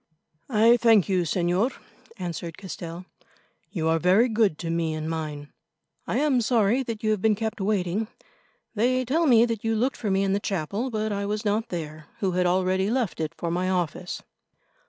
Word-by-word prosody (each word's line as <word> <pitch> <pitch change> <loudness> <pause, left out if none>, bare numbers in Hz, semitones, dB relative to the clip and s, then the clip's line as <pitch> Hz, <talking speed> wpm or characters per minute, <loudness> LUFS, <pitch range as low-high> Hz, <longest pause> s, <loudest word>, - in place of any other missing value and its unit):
"I 230 0 +5
thank 225 -5 +4
you, 185 -2 +2
Señor," 180 - +1 0.4
answered 170 -3 -5
Castell. 175 -2 -7 0.6
"You 160 -5 -2
are 165 0 +2
very 185 +8 +4
good 215 -7 +2
to 165 -1 -4
me 165 -1 -1
and 155 0 -4
mine. 155 -3 -5 0.5
I - - 0
am 280 -4 +2
sorry 230 +1 +2
that 230 -4 -5
you 215 - +2
have 210 -3 0
been 220 0 +3
kept 220 0 -3
waiting. 200 +1 0 0.7
They 255 +3 +1
tell 320 +7 +1
me 235 -3 +6
that 230 -3 -3
you 225 0 +1
looked 250 +5 0
for 215 - -3
me 195 0 +2
in 195 0 +1
the 200 - +1
chapel, 200 +6 -2
but 215 -2 -2
I 200 0 -2
was 210 +1 -3
not 210 +2 0
there, 155 -3 -6
who 190 -2 0
had 180 0 +1
already 185 +2 +1
left 240 -7 -1
it 155 -1 -3
for 170 - -3
my 180 +2 0
office." 180 -5 -2
200 Hz, 190 wpm, -25 LUFS, 175-225 Hz, 0.7 s, me